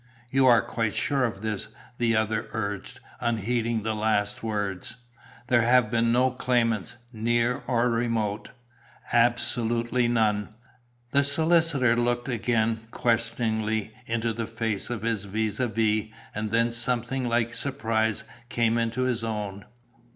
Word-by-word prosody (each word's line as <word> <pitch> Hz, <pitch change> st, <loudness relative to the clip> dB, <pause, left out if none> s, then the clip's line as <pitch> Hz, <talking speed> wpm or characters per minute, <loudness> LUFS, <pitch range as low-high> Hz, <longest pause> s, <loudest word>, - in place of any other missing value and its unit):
"You 135 Hz, 0 st, +4 dB
are 120 Hz, -2 st, +6 dB
quite 115 Hz, -2 st, -2 dB
sure 140 Hz, -2 st, +1 dB
of 110 Hz, -4 st, -4 dB
this?" 110 Hz, -2 st, -2 dB, 0.3 s
the 115 Hz, -1 st, +2 dB
other 110 Hz, +1 st, 0 dB
urged, 105 Hz, -3 st, -4 dB, 0.2 s
unheeding 115 Hz, 0 st, 0 dB
the 110 Hz, 0 st, -1 dB
last 105 Hz, -1 st, 0 dB
words. 105 Hz, -1 st, -3 dB, 0.5 s
"There 120 Hz, -1 st, +4 dB
have 120 Hz, -1 st, +4 dB
been 115 Hz, 0 st, +2 dB
no 125 Hz, +2 st, +3 dB
claimants, 120 Hz, -4 st, 0 dB, 0.2 s
near 120 Hz, +2 st, +1 dB
or 120 Hz, -1 st, +2 dB
remote?" 115 Hz, -3 st, -1 dB, 0.6 s
"Absolutely 120 Hz, 0 st, +2 dB
none." 110 Hz, -3 st, +1 dB, 0.6 s
The 140 Hz, -, +4 dB
solicitor 150 Hz, -4 st, +3 dB
looked 120 Hz, +1 st, 0 dB
again, 115 Hz, -2 st, 0 dB
questioningly, 110 Hz, -2 st, 0 dB
into 115 Hz, 0 st, -1 dB
the 115 Hz, 0 st, -3 dB
face 110 Hz, -3 st, -3 dB
of 120 Hz, -3 st, -4 dB
his 115 Hz, -3 st, -1 dB
vis 105 Hz, +1 st, -2 dB
à 125 Hz, -3 st, 0 dB
vis, 110 Hz, 0 st, +1 dB, 0.2 s
and 105 Hz, 0 st, -3 dB
then 115 Hz, +2 st, +2 dB
something 120 Hz, +2 st, -1 dB
like 115 Hz, 0 st, +1 dB
surprise 110 Hz, -6 st, -1 dB, 0.3 s
came 115 Hz, -1 st, +2 dB
into 115 Hz, +2 st, -1 dB
his 125 Hz, -3 st, 0 dB
own. 105 Hz, -3 st, -4 dB
115 Hz, 135 wpm, -26 LUFS, 110-120 Hz, 0.6 s, are